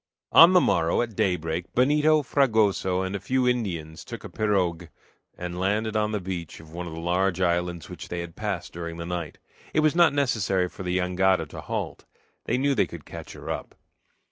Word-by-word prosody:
On 170 +3 +9
the 180 - +7
morrow, 85 - +2
at 115 -3 -7
daybreak, 85 -2 -1
Benito, 150 +4 +4
Fragoso, 110 -9 +2
and 95 +1 -3
a - - -2
few 130 +4 0
Indians 85 -10 -2
took - - -8
a - - -7
pirogue 90 -5 0 0.5
and 90 0 -5
landed 105 +3 0
on 105 0 +1
the 105 - -1
beach 90 -3 -6
of 80 -1 -14
one 85 +1 -5
of 80 - -7
the 80 - -6
large 90 +2 0
islands 85 -2 0
which - - -9
they 85 0 -4
had 85 -1 -8
passed 100 -5 -4
during 85 -1 -6
the 85 - -5
night. 85 -2 -4 0.4
It 155 - +4
was 155 -1 +3
not 170 -3 +6
necessary 110 -10 +1
for - - -11
the 90 -1 -1
jangada 95 +1 +2
to - - -8
halt. - - -4 0.4
They 120 - +1
knew 140 +2 +2
they - - +2
could 85 -4 -10
catch - - -9
her - - -6
up. - - -6
95 Hz, 200 wpm, -26 LUFS, 85-115 Hz, 0.5 s, On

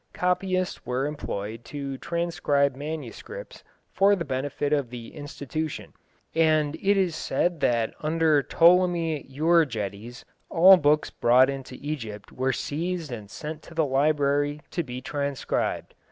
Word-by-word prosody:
Copyists 185 0 -1
were 125 +2 -1
employed 115 -6 -5
to 140 +1 -5
transcribe 150 -5 0
manuscripts 155 - -7 0.3
for 200 +1 +4
the 170 -4 -4
benefit 140 +2 -2
of 140 -5 0
the 120 -1 -9
institution, 145 +1 -5 0.4
and 155 -2 +3
it 200 +1 +3
is 180 -4 +1
said 175 +2 -1
that 115 -2 +1
under 155 -1 +2
Ptolemy 170 -1 +3
Euergetes 125 - 0 0.3
all 185 +3 +8
books 150 -1 +2
brought 130 +3 +4
into 135 -2 -7
Egypt 115 -9 -6
were 130 +1 0
seized 165 +3 -3
and 105 -4 -7
sent 155 +5 -7
to 165 - -14
the 160 -1 +2
library 145 +1 +1
to 175 - -1
be 125 -4 -6
transcribed. 140 -2 -2
145 Hz, 130 wpm, -26 LUFS, 130-165 Hz, 0.4 s, all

